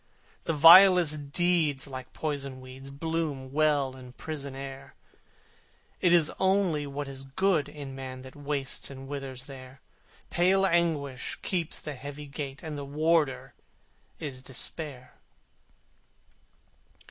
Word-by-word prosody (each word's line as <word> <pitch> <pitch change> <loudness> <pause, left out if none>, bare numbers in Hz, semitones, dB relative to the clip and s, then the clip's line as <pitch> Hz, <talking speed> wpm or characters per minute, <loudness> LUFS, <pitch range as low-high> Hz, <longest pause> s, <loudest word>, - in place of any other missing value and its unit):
The 165 - 0
vilest 165 -2 +7
deeds 165 -5 +2
like 130 -2 -8
poison 140 -4 -4
weeds 130 +1 -10
Bloom 145 -2 -3
well 145 -3 +2
in 125 -1 -12
prison 140 -2 -6
air: 135 0 -8 1.0
It 180 - +3
is 170 -3 +5
only 190 -6 +2
what 140 +1 -4
is 135 -1 -6
good 155 +2 +1
in 145 -2 -8
Man 130 -1 -7
That 130 - -12
wastes 145 -2 -3
and 135 -1 -9
withers 135 -2 -6
there: 130 -1 -11 0.5
Pale 190 +2 +4
Anguish 160 -7 0
keeps 175 -5 -1
the 150 - -6
heavy 145 +2 -8
gate, 140 0 -6
And 155 -3 -5
the - - -5
warder 150 0 +1 0.7
is 135 -4 -6
Despair. 135 0 -5
145 Hz, 125 wpm, -28 LUFS, 135-160 Hz, 1.0 s, vilest